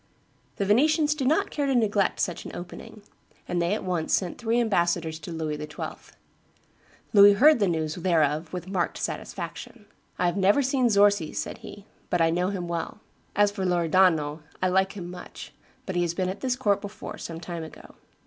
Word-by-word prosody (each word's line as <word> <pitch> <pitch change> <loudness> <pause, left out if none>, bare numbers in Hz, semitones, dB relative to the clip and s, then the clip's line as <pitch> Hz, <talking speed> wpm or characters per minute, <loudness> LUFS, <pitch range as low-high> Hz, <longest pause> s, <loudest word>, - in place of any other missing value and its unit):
The 200 - -1
Venetians 300 - +3
did 275 -4 -2
not 310 +4 +2
care 285 -2 -1
to 270 - +1
neglect 205 -5 +1
such 175 -1 -2
an - - -8
opening; 210 +4 -9 0.4
and 175 -1 -1
they 175 +4 +1
at - - -5
once 180 -4 0
sent 180 -3 -3
three 235 0 +1
ambassadors 170 -7 0
to 175 - -8
Louis 160 -2 -3
XII. 150 0 -7 1.0
Louis 205 -1 +8
heard 290 +6 +6
the 200 - +3
news 160 -3 -1
thereof 160 -3 +1
with 180 0 -6
marked 185 -2 -1
satisfaction. 225 -4 -6 0.3
"I 180 - 0
have 175 +2 0
never 200 +8 +4
seen 260 -2 +2
Zorzi," 200 -5 +3
said - - -4
he, 205 -1 -11 0.2
"but 175 - +1
I 165 0 +3
know 180 +2 0
him 185 -3 -4
well; 170 +4 -4 0.4
as 205 0 +4
for 200 -2 -4
Loredano, 170 -3 +2 0.2
I 185 - +1
like 190 +1 +2
him 175 -3 -7
much; 180 - -10 0.4
he 175 - +1
has 170 -1 -1
been 185 0 -1
at 190 - -6
this 255 -2 0
court 210 -6 +1
before, 205 0 -8
some 165 -1 -6
time 170 0 -6
ago." 160 - -12
185 Hz, 185 wpm, -26 LUFS, 170-210 Hz, 1.0 s, Louis